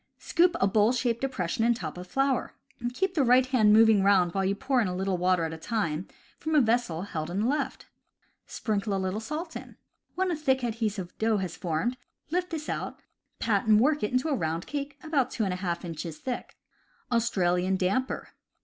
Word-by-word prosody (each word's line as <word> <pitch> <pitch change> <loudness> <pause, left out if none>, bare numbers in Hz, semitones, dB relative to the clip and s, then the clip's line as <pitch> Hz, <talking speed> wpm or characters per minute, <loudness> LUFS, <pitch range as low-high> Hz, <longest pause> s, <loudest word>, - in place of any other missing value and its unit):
Scoop 350 +1 +2
a - - +4
bowl 210 +3 +3
shaped 240 -2 0
depression 225 -7 -1
in 235 +1 +4
top 160 -8 -5
of 180 +1 -8
flour. 270 +5 0 0.4
Keep 370 +8 -1
the 305 -6 +2
right 250 +1 +5
hand 245 -5 +4
moving 220 -1 +6
round 190 -3 +4
while 195 - 0
you 195 +1 +1
pour 260 +3 +1
in 215 - +1
a 180 - -3
little 190 0 0
water 180 -1 +2
at 160 0 -2
a 160 - -8
time 175 -5 -2 0.3
from 315 0 -1
a - - +7
vessel 225 - +1
held 160 -5 -4
in 190 +4 -1
the 225 - +1
left. 280 0 -2 0.6
Sprinkle 205 -2 -2
a - - 0
little 190 +2 -2
salt 305 +8 -5
in. - - -8 0.4
When 370 0 +1
a - - 0
thick, 265 -4 +1
adhesive 215 -6 -2
dough 220 -1 +2
has 185 -4 -3
formed, 175 +10 -1 0.3
lift 360 +1 0
this 310 -2 -5
out - - -3
and - - -33 0.4
pat 215 -1 0
and 215 -1 +6
work 295 +5 +3
it 210 - -1
into 255 +5 +1
a - - +1
round 165 -4 -2
cake 285 0 -5
about 290 -6 +1
2^ 180 -6 -2
inches 165 -1 -5
thick. 250 -2 -5 0.5
Australian 190 -5 +1
Damper. 195 +8 -1
220 Hz, 200 wpm, -28 LUFS, 185-260 Hz, 0.6 s, a